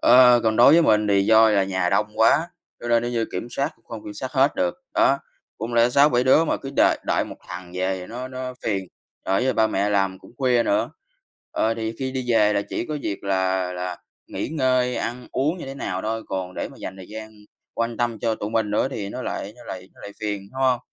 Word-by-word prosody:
Ờ, 125 0 +7
còn 110 -1 +1
đối 120 - +8
với 170 +1 +6
mình 105 -6 +3
thì 100 -1 +4
do 110 0 +6
là 100 -2 +3
nhà 95 -2 0
đông 100 +2 +2
quá, 140 +9 +4 0.3
cho 120 - -5
nên 115 -1 +3
nếu 120 - -2
như 115 -1 0
kiểm 120 - -4
soát 140 +5 -1
cũng 115 - -33
không 115 -2 -8
kiểm 105 - -7
soát 130 +5 -5
hết 135 0 +3
được. 90 -1 0 0.2
Đó, - - +4 0.4
không 115 +2 -4
lẽ 115 0 +5
6,7 130 -2 +4
đứa 135 +5 +5
mà - - 0
cứ 135 - -7
đợi - - +4
đợi - - +1
1 - - -9
thằng 90 0 -8
về 95 +1 -1
thì 90 - -8
nó 125 +4 -6
nó 130 0 -6
phiền, 100 -4 -1 0.4
rồi 95 +4 +2
với 130 - +2
ba 110 -2 +3
mẹ 100 -1 0
làm 95 -2 +1
cũng - - -16
khuya 125 -3 +3
nữa. 310 - +1 0.6
Ờ, 110 +1 0
thì 110 -1 -3
khi 130 -1 -3
đi 130 -1 -3
về 105 -2 +4
là 100 0 +1
chỉ - - -3
có 155 - -3
việc 100 - -4
là 95 -1 0
là 90 0 -4 0.3
nghỉ - - -4
ngơi, 130 -4 +1
ăn 125 +1 -4
uống 150 +7 0
như - - -7
thế 135 - -6
nào 95 -8 -4
thôi, 110 +1 -2
còn 90 -1 -4
để - - -3
mà - - -15
dành 95 - -6
thời 95 -1 -11
gian 110 0 -8 0.4
quan 115 0 -2
tâm 120 -2 -1
cho 115 +1 0
tụi 105 -1 -5
mình 110 -2 0
nữa 105 +5 +1
thì 105 -7 -5
nó - - -6
lại - - -4
nó - - -14
lại 95 0 -8
nó - - -18
lại 100 - -9
phiền, 105 -2 -3
đúng 130 - -6
hông? 130 -2 +3
115 Hz, 250 wpm, -23 LUFS, 100-130 Hz, 0.6 s, đối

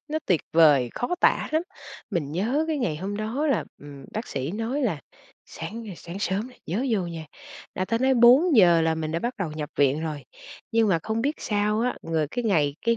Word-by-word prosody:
nó 310 +1 -1
tuyệt 175 -4 +3
vời, 145 -7 +5
khó 245 +9 -1
tả - - +3
lắm. 315 +1 +2 0.5
Mình 155 -7 -2
nhớ 235 - 0
cái 310 -2 0
ngày 175 - -1
hôm 195 +5 -4
đó 225 +8 -2
là, 280 - +1
ừm, 140 -1 -11
bác 220 +3 -4
sĩ 135 +1 -3
nói 225 +8 -2
là 175 - -1 0.5
"Sáng, 220 +8 -7
ơ, 195 - -7
sáng 175 +4 -8
sớm 200 +4 -1
nè 250 - -17
nhớ 210 +11 -1
vô 210 -4 +1
nha", 165 -2 -7 0.5
là 185 - -1
ta 230 +4 -1
nói 265 +2 +3
4:00 240 - +6
là 160 0 +2
mình 160 -1 -3
đã 165 - 0
bắt 240 +8 -3
đầu 185 -6 -2
nhập 150 -2 -5
viện 145 +1 +3
rồi. 150 -4 -4 0.5
Nhưng 225 -1 +3
mà 175 -4 +3
không 220 +1 -2
biết 290 +4 0
sao 210 0 0
á, 250 +2 0
người 160 -2 -1
cái 245 -1 -3
ngày 150 -9 +2
cái 230 0 +3
200 Hz, 220 wpm, -25 LUFS, 160-235 Hz, 0.5 s, 4:00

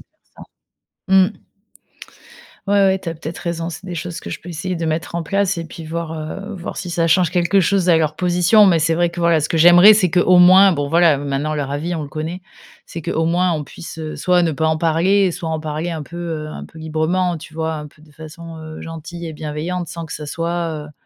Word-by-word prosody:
de - - -18
faire - - -50
ça. - - -13 0.7
Mmh. 190 +2 +2 1.2
Ouais, 200 - +2
ouais, 190 0 +2
tu 175 - -6
as 165 - -4
peut-être 160 +1 -7
raison, 170 -1 -3
c'est 165 +3 -9
des 180 -2 -5
choses 175 +2 -5
que - - -8
je 160 - -5
peux 180 - -12
essayer 175 +2 -4
de 165 0 -3
mettre 160 +2 -3
en 170 - -3
place 195 +2 0
et 165 - -4
puis 165 0 -10
voir, 165 0 -4
heu, 195 +7 -6
voir 180 -2 -7
si 180 -2 -5
ça 165 -1 0
change 170 0 +3
quelque 175 +2 +2
chose 190 -1 +2
à 170 - +6
leur 155 -1 0
position. 180 +5 +4
Mais 175 -4 +4
c'est 165 +1 +1
vrai 175 +1 +1
que 170 - -10
voilà, 170 -2 +3
ce 150 - -2
que - - -1
j'aimerais 175 +6 +8
c'est 185 -5 +1
qu'au 180 0 +4
moins, 185 +2 +7
bon 145 -5 -1
voilà, 165 -2 +4
maintenant 145 +2 -2
leur 140 -2 -3
avis, 155 +5 -3
on 160 - -4
le - - -9
connaît, 160 +5 -5 0.5
c'est 165 - -8
qu'au 160 +2 -1
moins 175 +2 +1
on 155 -2 -3
puisse, 165 +2 -10
heu, 155 -1 -5
soit 180 -1 +2
ne 165 - 0
pas 160 +2 0
en 160 0 0
parler 175 +4 +2
soit 165 - -5
en 160 -1 -2
parler 155 +2 -4
un 160 -3 -5
peu, 170 - -11
heu, 165 -3 -4
un 155 - -8
peu 160 - -14
librement, 160 +3 -1
tu 160 0 -12
vois? 160 0 -2
Un 150 -1 -7
peu 150 - -25
de 155 -1 -19
façon, 160 +2 -10
heu, 155 0 -9
gentille 165 +1 -8
et 160 - -6
bienveillante 155 +3 -4
sans 170 -1 -7
que 160 - -8
ça 150 - -6
soit, 165 -1 -3
heu 150 - -14
165 Hz, 250 wpm, -19 LUFS, 155-180 Hz, 1.2 s, j'aimerais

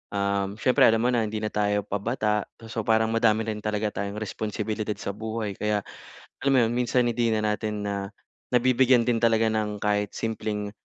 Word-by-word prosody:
um, 100 0 0
syempre 125 +3 +4
alam 115 +1 +3
mo 125 - +3
na 115 -3 +1
hindi 110 0 -4
na 110 - -2
tayo 105 -1 +1
pabata, 105 +1 -1 0.2
so, 115 -2 -4
parang 110 0 +3
madami 115 -1 +3
rin 110 -1 -3
talaga 105 -1 -2
tayong 100 0 -3
responsibilidad 105 0 -3
sa 100 - -4
buhay 110 -1 -4
kaya, 105 -1 0 0.6
alam 140 - +3
mo - - +5
'yon, 120 - -2
minsan 125 0 +2
hindi 120 -1 +1
na 110 - +1 0.2
natin 105 -1 -4
na 100 - -1 0.6
nabibigyan 125 0 +4
din 115 -2 +2
talaga 115 -1 +4
ng 105 -1 -1
kahit 105 -1 0
simpleng, 105 -2 -3
110 Hz, 185 wpm, -26 LUFS, 105-115 Hz, 0.6 s, mo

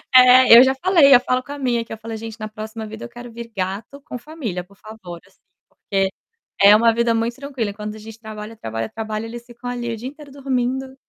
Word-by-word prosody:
É, 255 -1 +9
eu 250 - +10
já 265 0 +3
falei, 305 -2 +5
eu - - +7
falo 255 0 -1
com 280 - -11
a 285 - -6
minha 240 -3 0
que - - -8
eu - - -7
falei: 225 0 -7
"Gente, 225 +1 -8
na 215 - -4
próxima 220 0 -7
vida, 220 +1 -8
eu - - -10
quero 240 0 -11
vir 230 0 -9
gato 195 +9 -4
com 250 - -7
família, 240 - -6
por 200 +2 -22
favor", 195 -5 -11
assim. - - -27 0.3
Porque 195 -1 -2 0.5
é 200 +1 +9
uma 230 +1 +4
vida 235 0 +1
muito 230 +1 -1
tranquila, 265 -7 -4
enquanto 210 +1 -7
a - - -11
gente 225 +1 -11
trabalha, 220 0 -9
trabalha, 115 - -4
trabalha, 220 0 -5
eles 235 +1 -8
ficam 240 0 -11
ali 240 -1 -4
o 230 - -4
dia 240 +4 -6
inteiro 290 -1 -14
dormindo. 265 -1 -2
230 Hz, 240 wpm, -21 LUFS, 215-255 Hz, 0.5 s, eu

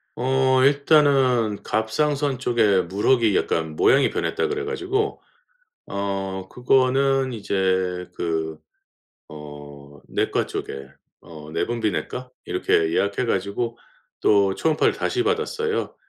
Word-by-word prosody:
어 130 +1 +2
일단은 135 -6 +3
'갑상선 140 +5 0
쪽에 110 -6 +2
물혹이 105 +4 +2
약간 80 -1 -1
모양이 135 - +4
변했다.' - - -1
그래 430 0 -3
가지고 420 -1 -2 0.7
어 95 -1 -4
그거는 130 +1 +2
이제 95 -4 -1
그 80 -2 -3 0.7
어 75 -1 -11
내과 - - 0
쪽에 70 - -6 0.3
어 75 -2 -12
내분비내과 120 +4 -2 0.2
이렇게 80 -2 +1
예약해 100 +5 0
가지고 115 +3 -2 0.4
또 100 -2 +3
초음파를 155 +5 +1
다시 370 - -1
받았어요. 450 +1 -1
115 Hz, 235 characters per minute, -23 LUFS, 95-135 Hz, 0.7 s, 모양이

